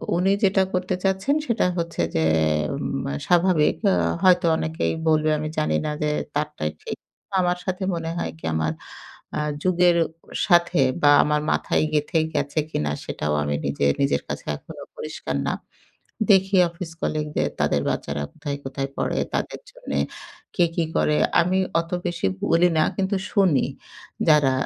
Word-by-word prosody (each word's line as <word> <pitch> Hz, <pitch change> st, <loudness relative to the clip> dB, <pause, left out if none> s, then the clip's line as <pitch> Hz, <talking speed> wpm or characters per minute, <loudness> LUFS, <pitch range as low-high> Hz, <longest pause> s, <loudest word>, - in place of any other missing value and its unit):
উনি 185 Hz, +3 st, +2 dB
যেটা 195 Hz, 0 st, +4 dB
করতে 185 Hz, +1 st, 0 dB
চাচ্ছেন 195 Hz, +9 st, +1 dB
সেটা 235 Hz, -2 st, +1 dB
হচ্ছে 170 Hz, -, -2 dB
যে 80 Hz, -, +2 dB, 0.5 s
উম -, -, -3 dB, 0.2 s
স্বাভাবিক। 175 Hz, -3 st, +3 dB, 0.2 s
আ -, -, +3 dB, 0.3 s
হয়তো 180 Hz, -1 st, +5 dB
অনেকেই 160 Hz, +1 st, -1 dB
বলবে 155 Hz, 0 st, +3 dB
আমি 155 Hz, -, -3 dB
জানি 75 Hz, 0 st, +1 dB
না 150 Hz, -, -1 dB
যে, 150 Hz, -, +1 dB, 0.3 s
তারটাই 150 Hz, -, -2 dB
ঠিক। -, -, -5 dB, 0.4 s
আমার 180 Hz, -1 st, +1 dB
সাথে 185 Hz, 0 st, -2 dB
মনে 165 Hz, -1 st, -4 dB
হয় 80 Hz, -, -2 dB
কি 80 Hz, -, -10 dB
আমার 80 Hz, 0 st, 0 dB, 0.6 s
আ -, -, 0 dB, 0.2 s
যুগের 180 Hz, -1 st, +4 dB
অ -, -, -4 dB, 0.4 s
সাথে 175 Hz, -3 st, +4 dB, 0.2 s
বা, 145 Hz, -, +6 dB
আমার 150 Hz, 0 st, +1 dB
মাথায় -, -, +1 dB
গেঁথে 150 Hz, +3 st, +1 dB
গেছে 145 Hz, +2 st, -1 dB
কিনা, 75 Hz, -, -1 dB
সেটাও 75 Hz, 0 st, -2 dB
আমি 75 Hz, 0 st, -1 dB
নিজে, 70 Hz, 0 st, 0 dB, 0.2 s
নিজের 140 Hz, +1 st, +2 dB
কাছে -, -, -5 dB
এখনো -, -, -11 dB
পরিষ্কার 70 Hz, -, -5 dB
না। -, -, +1 dB, 0.8 s
দেখি 195 Hz, 0 st, +5 dB
অফিস 170 Hz, 0 st, -7 dB
কলিগদের 150 Hz, -1 st, -1 dB
তাদের -, -, +2 dB
বাচ্চারা 70 Hz, 0 st, -2 dB
কোথায়, 140 Hz, -1 st, -5 dB
কোথায় 135 Hz, +1 st, -3 dB
পড়ে। -, -, -1 dB, 0.2 s
তাদের -, -, -2 dB
জন্যে -, -, -5 dB, 0.6 s
কে 175 Hz, -, +4 dB
কি 170 Hz, -, +1 dB
করে। 150 Hz, -, +2 dB, 0.2 s
আমি 180 Hz, +2 st, +1 dB, 0.2 s
অত 165 Hz, 0 st, -5 dB
বেশি 175 Hz, -, -2 dB, 0.2 s
বলি 170 Hz, +2 st, +4 dB
না, 155 Hz, -, +5 dB
কিন্তু 195 Hz, +1 st, 0 dB, 0.2 s
শুনি। 185 Hz, -9 st, +3 dB, 0.6 s
যারা 150 Hz, -3 st, +5 dB
165 Hz, 155 wpm, -23 LUFS, 145-185 Hz, 0.8 s, বা